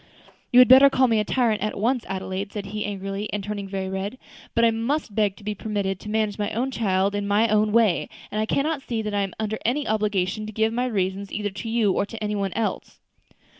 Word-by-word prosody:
"You 245 Hz, -, +4 dB
had 250 Hz, 0 st, +9 dB
better 265 Hz, +2 st, +9 dB
call 260 Hz, -1 st, +3 dB
me 225 Hz, -2 st, +2 dB
a -, -, +2 dB
tyrant 230 Hz, -1 st, +1 dB
at 215 Hz, -, -2 dB
once, 240 Hz, +3 st, 0 dB
Adelaide," 190 Hz, +1 st, -4 dB
said 205 Hz, -2 st, -5 dB
he 210 Hz, +1 st, -4 dB
angrily, 195 Hz, +1 st, -4 dB
and 205 Hz, -1 st, -3 dB
turning 205 Hz, -1 st, -4 dB
very 190 Hz, -1 st, -3 dB
red; 190 Hz, +5 st, -4 dB, 0.4 s
"but 230 Hz, 0 st, +4 dB
I 230 Hz, -, +5 dB
must 230 Hz, +2 st, -2 dB
beg 205 Hz, -2 st, +1 dB
to 210 Hz, -, -16 dB
be 210 Hz, +1 st, -2 dB
permitted 200 Hz, -2 st, -3 dB
to 210 Hz, -, -9 dB
manage 215 Hz, -1 st, -1 dB
my 205 Hz, 0 st, 0 dB
own 255 Hz, +4 st, -1 dB
child 195 Hz, -4 st, +1 dB
in 205 Hz, 0 st, -2 dB
my 210 Hz, +3 st, +3 dB
own 215 Hz, 0 st, +3 dB
way; 220 Hz, -5 st, +3 dB, 0.2 s
and 215 Hz, -, -1 dB
I 220 Hz, -, -1 dB
cannot 295 Hz, +3 st, 0 dB
see 230 Hz, -4 st, -3 dB
that 210 Hz, -1 st, -3 dB
I 205 Hz, -, +1 dB
am 195 Hz, -2 st, -3 dB
under 220 Hz, 0 st, -2 dB
any 275 Hz, +6 st, 0 dB
obligation 210 Hz, -1 st, 0 dB
to -, -, -6 dB
give 220 Hz, +1 st, 0 dB
my 250 Hz, +2 st, 0 dB
reasons 195 Hz, -3 st, -2 dB
either 205 Hz, -1 st, -2 dB
to 195 Hz, +3 st, -6 dB
you 225 Hz, -3 st, +2 dB
or 200 Hz, -, 0 dB
to 225 Hz, -, -8 dB
any 210 Hz, 0 st, -1 dB
one 200 Hz, -2 st, -1 dB
else." 225 Hz, -1 st, -3 dB
210 Hz, 245 wpm, -24 LUFS, 200-225 Hz, 0.4 s, had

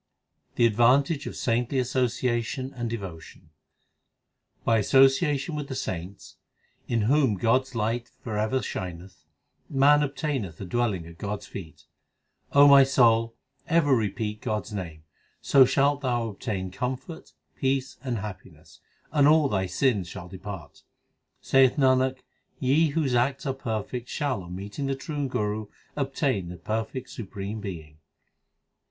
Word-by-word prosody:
The 120 Hz, -, +4 dB
advantage 135 Hz, +7 st, +3 dB
of -, -, -6 dB
saintly 120 Hz, +3 st, 0 dB
association 125 Hz, 0 st, -1 dB
and 120 Hz, -2 st, -4 dB
devo 95 Hz, -8 st, -5 dB
tion: 80 Hz, 0 st, -16 dB, 1.1 s
By 115 Hz, -1 st, +3 dB
association 135 Hz, -, +3 dB
with 150 Hz, -2 st, -4 dB
the 135 Hz, -, -5 dB
saints, 95 Hz, -2 st, -6 dB, 0.5 s
in 115 Hz, -2 st, +1 dB
whom 130 Hz, 0 st, +3 dB
God 115 Hz, +6 st, +3 dB
s 130 Hz, -1 st, -15 dB
light 115 Hz, +2 st, -1 dB
for 110 Hz, -3 st, -4 dB
ever 110 Hz, +5 st, 0 dB
shineth, 90 Hz, 0 st, -7 dB, 0.4 s
Man 145 Hz, +2 st, +5 dB
obtaineth 140 Hz, -, -3 dB
a 100 Hz, -, -5 dB
dwelling 105 Hz, -4 st, -1 dB
at 85 Hz, +1 st, -13 dB
God 105 Hz, 0 st, -3 dB
s -, -, -11 dB
feet. 80 Hz, -5 st, -10 dB, 0.7 s
O 145 Hz, +1 st, +7 dB
my 140 Hz, -1 st, +9 dB
soul, 115 Hz, -4 st, +3 dB, 0.3 s
ever 155 Hz, -5 st, +4 dB
repeat 105 Hz, -1 st, -2 dB
God 105 Hz, -2 st, -2 dB
s -, -, -11 dB
name, 85 Hz, -6 st, -6 dB, 0.4 s
So 135 Hz, -2 st, +6 dB
shalt 140 Hz, +2 st, +2 dB
thou 120 Hz, -4 st, 0 dB
obtain 95 Hz, -3 st, -4 dB
comfort, 130 Hz, -, -5 dB, 0.2 s
peace, 130 Hz, 0 st, -1 dB
and 125 Hz, -4 st, -2 dB
happiness; 105 Hz, -2 st, -10 dB, 0.3 s
and 145 Hz, -2 st, +4 dB
all 155 Hz, -2 st, +5 dB
thy 95 Hz, -4 st, 0 dB
sins 105 Hz, -4 st, +1 dB
shall 90 Hz, +1 st, -8 dB
depart. 95 Hz, -4 st, -9 dB, 0.6 s
Saith 135 Hz, -1 st, +4 dB
Nanak, 130 Hz, -2 st, +2 dB, 0.4 s
ye 145 Hz, +5 st, +3 dB
whose 145 Hz, -3 st, 0 dB
acts 130 Hz, +4 st, +1 dB
are 135 Hz, -, 0 dB
perfect 120 Hz, -1 st, -4 dB
Shall 140 Hz, -8 st, -1 dB
on 90 Hz, 0 st, -8 dB
meeting 105 Hz, +8 st, -5 dB
the 135 Hz, -, 0 dB
true 145 Hz, 0 st, -4 dB
Guru 105 Hz, -3 st, -2 dB, 0.3 s
obtain 135 Hz, -, -1 dB
the 90 Hz, -, -8 dB
perfect 110 Hz, +7 st, -4 dB
supreme 105 Hz, 0 st, -6 dB
Being. 80 Hz, -6 st, -8 dB
120 Hz, 145 wpm, -26 LUFS, 100-135 Hz, 1.1 s, my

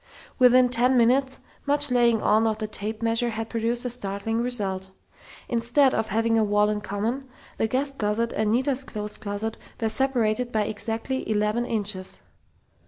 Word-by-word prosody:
Within 250 Hz, 0 st, +6 dB
ten 250 Hz, +2 st, +3 dB
minutes, 260 Hz, +3 st, +2 dB, 0.3 s
much 290 Hz, -1 st, +4 dB
laying 235 Hz, -3 st, +3 dB
on 220 Hz, +1 st, +3 dB
of 215 Hz, -1 st, 0 dB
the 215 Hz, -, -3 dB
tape 215 Hz, +1 st, -6 dB
measure 230 Hz, +1 st, +1 dB
had 225 Hz, 0 st, -5 dB
produced 235 Hz, +2 st, -1 dB
a -, -, 0 dB
startling 225 Hz, 0 st, -2 dB
result. 195 Hz, -6 st, -2 dB, 0.6 s
Instead 245 Hz, +3 st, +2 dB
of 220 Hz, 0 st, 0 dB
having 225 Hz, +2 st, +1 dB
a -, -, +3 dB
wall 210 Hz, 0 st, +2 dB
in 210 Hz, 0 st, -2 dB
common, 215 Hz, +7 st, -3 dB, 0.3 s
the 220 Hz, -, +2 dB
guest 275 Hz, +4 st, -2 dB
closet 215 Hz, +2 st, 0 dB
and 215 Hz, 0 st, 0 dB
Nita's 260 Hz, +3 st, +1 dB
clothes 210 Hz, -4 st, -5 dB
closet 215 Hz, +1 st, -4 dB, 0.2 s
were 225 Hz, -, 0 dB
separated 245 Hz, -1 st, 0 dB
by 215 Hz, -2 st, +1 dB
exactly 225 Hz, +5 st, -4 dB
eleven 215 Hz, +3 st, 0 dB
inches! 200 Hz, -4 st, -2 dB
225 Hz, 165 wpm, -25 LUFS, 210-245 Hz, 0.6 s, Within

